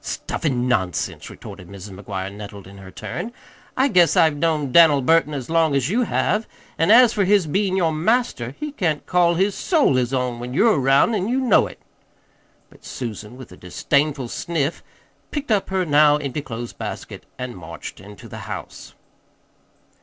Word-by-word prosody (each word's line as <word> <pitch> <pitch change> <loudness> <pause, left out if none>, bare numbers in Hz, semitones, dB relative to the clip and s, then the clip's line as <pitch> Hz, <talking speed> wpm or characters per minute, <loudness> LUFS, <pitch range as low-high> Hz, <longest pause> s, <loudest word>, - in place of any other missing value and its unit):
"Stuff - - -5
an' 125 -4 0
nonsense!" 95 -7 -2
retorted 90 - -11
Mrs. 100 +1 -10
McGuire 95 0 -6
nettled 100 -1 -9
in 100 +1 -13
her 95 -1 -11
turn. 225 - -6 0.5
"I 265 +2 +4
guess 180 -9 +4
I've 160 -2 +4
known 150 -3 0
Dan'l 150 -4 +6
Burton 160 +1 +3
as 130 -3 -5
long 165 -3 +2
as 140 +4 0
you 240 +3 +1
have; 215 0 0 0.3
an' 165 - +2
as 240 +2 +7
for 205 - +1
his 195 -1 +3
bein' 190 +5 0
your 170 -4 +2
master 160 - 0
he 300 -1 -4
can't 165 - -2
call 175 -1 +2
his 195 +3 +1
soul 305 - +2
his 125 0 0
own 125 -2 -1
when 125 +1 -6
you're 215 -2 +4
around, 135 - +4
an' 200 -2 -1
you 250 +3 0
know 250 -6 +3
it." - - -12 0.9
But - - -20
Susan, 115 -1 -7
with 130 -6 -12
a 90 - -13
disdainful 140 - -1
sniff, 160 0 -2 0.5
picked 290 -5 -4
up 205 -3 +1
her 190 -1 0
now 150 -1 +5
empty 145 0 -4
clothes 120 -3 -7
basket - - -7
and 125 -1 -6
marched 85 -2 -9
into 100 +1 -12
the - - -9
house. - - -8
150 Hz, 180 wpm, -21 LUFS, 120-185 Hz, 0.9 s, as